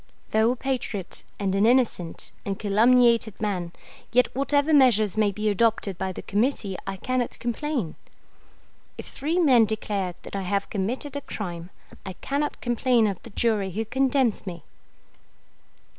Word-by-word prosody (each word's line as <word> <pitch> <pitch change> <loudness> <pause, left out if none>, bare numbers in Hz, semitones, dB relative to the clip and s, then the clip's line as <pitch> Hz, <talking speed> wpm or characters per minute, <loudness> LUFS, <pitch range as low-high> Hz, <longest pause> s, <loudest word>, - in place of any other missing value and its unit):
Though 220 +1 +3
a 250 - +1
patriot 240 -7 -3 0.2
and 195 -2 0
an 200 +3 +3
innocent 235 -9 +1
and 195 -1 -3
calumniated 230 +1 +3
man, 185 -5 -2 0.4
yet 250 +1 +2
whatever 285 +3 +2
measures 225 -8 +5
may 215 -2 +2
be 210 +2 -3
adopted 210 -3 +1
by 190 0 -2
the - - -8
Committee 210 -2 0
I 195 0 -3
cannot 255 +4 -2
complain. 240 - -2 1.0
If - - -7
three 310 +6 -2
men 260 -10 +5
declare 200 -4 -2
that - - -8
I 195 - -2
have 200 +1 -2
committed 245 +8 -2
a 285 - -3
crime, 175 -8 -6 0.3
I 190 - -6
cannot 285 +9 -3
complain 240 -1 +2
of 200 -3 -2
the - - -11
jury 215 -2 0
who 215 +5 -3
condemns 260 -3 +1
me. 170 -4 -6
220 Hz, 150 wpm, -25 LUFS, 195-255 Hz, 1.0 s, measures